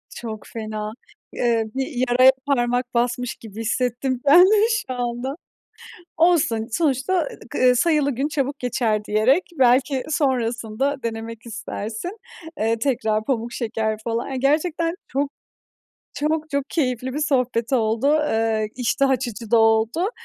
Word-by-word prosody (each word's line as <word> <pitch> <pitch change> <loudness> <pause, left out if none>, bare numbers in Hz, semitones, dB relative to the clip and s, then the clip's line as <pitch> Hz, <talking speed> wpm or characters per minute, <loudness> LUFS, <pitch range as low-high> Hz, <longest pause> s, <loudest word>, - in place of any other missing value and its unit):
Çok 220 -3 -7
fena! 215 -1 -5 0.4
Eee, 230 -2 +1
bir 265 0 -1 0.2
yaraya 255 +2 +6
parmak 245 -2 0
basmış 240 0 0
gibi 220 0 -9
hissettim 250 +2 -1
ben 300 +5 +8
de 420 - +4
şu 420 - -1
anda. 245 +3 -3 0.8
Olsun, 310 -10 +3
sonuçta 305 +3 +1 0.2
k 250 +1 +3
"sayılı 300 0 +2
gün 275 +3 0
çabuk 280 -1 -2
geçer" 225 -4 0
diyerek 225 - +3 0.2
belki 255 +1 +3
sonrasında 260 -2 -1
denemek 225 0 -5
istersin, 225 - -6 0.4
eee, 225 +1 +1
tekrar 220 -5 0
pamuk 235 -2 -1
şeker 220 -2 -2
falan. 230 0 -2
Yani 265 - -3
gerçekten 330 +5 +1
çok, 280 +2 -1 0.8
çok, 310 +1 -1
çok 280 -1 0
keyifli 255 -4 -1
bir 295 - -2
sohbet 250 -5 0
oldu. 230 +4 +2 0.2
Eee, 220 -1 0
iştah 260 +2 +1
açıcı 235 -4 -2
da 235 - +5
oldu. 225 - +2
250 Hz, 130 wpm, -22 LUFS, 225-280 Hz, 0.8 s, ben